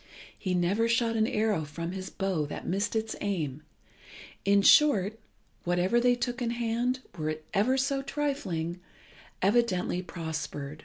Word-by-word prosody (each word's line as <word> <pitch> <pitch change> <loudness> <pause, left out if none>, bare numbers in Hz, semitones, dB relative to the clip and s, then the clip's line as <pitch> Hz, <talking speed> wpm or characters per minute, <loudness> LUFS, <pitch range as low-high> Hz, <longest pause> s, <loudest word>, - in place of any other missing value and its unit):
He 185 -3 -2
never 190 +6 +2
shot 230 0 +2
an 220 0 +3
arrow 210 -7 +1
from 165 +4 -5
his 190 0 -5
bow 185 -6 -1
that - - -6
missed 200 +4 -1
its 220 0 -1
aim. 155 -9 -2 0.8
In 200 0 +4
short, 220 -8 +5 0.4
whatever 180 +6 +2
they 245 0 +4
took 245 0 -3
in 235 - 0
hand, 240 +2 -1
were 155 -2 -2
it 155 0 -5
ever 240 +7 +3
so 275 +1 +1
trifling, 270 - -2 0.6
evidently 195 -4 +2
prospered. 155 -4 -5
200 Hz, 145 wpm, -29 LUFS, 175-235 Hz, 0.8 s, short